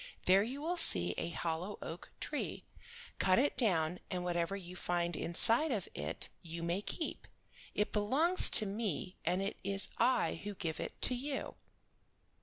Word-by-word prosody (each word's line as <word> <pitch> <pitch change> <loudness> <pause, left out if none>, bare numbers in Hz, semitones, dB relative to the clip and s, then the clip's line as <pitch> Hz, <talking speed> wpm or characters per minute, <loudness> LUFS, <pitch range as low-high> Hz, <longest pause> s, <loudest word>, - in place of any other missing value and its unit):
There 190 +2 +5
you 260 +7 -4
will 350 +3 -2
see 90 - +5
a 165 - -3
hollow 170 +4 -4
oak 165 +2 -8
tree. - - -4 0.5
Cut 185 -1 +3
it 280 +4 +2
down, 180 -8 +1
and 180 -1 -3
whatever 175 +1 -1
you 180 -2 -9
find 175 -1 -2
inside 230 - +4
of 205 -7 -2
it 75 +2 -1
you 165 0 -7
may 170 +3 -1
keep; 315 +9 -5 0.5
it 210 - -1
belongs 280 - +4
to 215 - +7
me, 195 -3 -3
and 185 +2 0
it 200 - -3
is 195 +1 -1
I 255 - +1
who 205 0 -5
give 165 -4 -4
it - - -6
to - - +5
you." 270 +3 -4
195 Hz, 165 wpm, -34 LUFS, 170-235 Hz, 0.5 s, to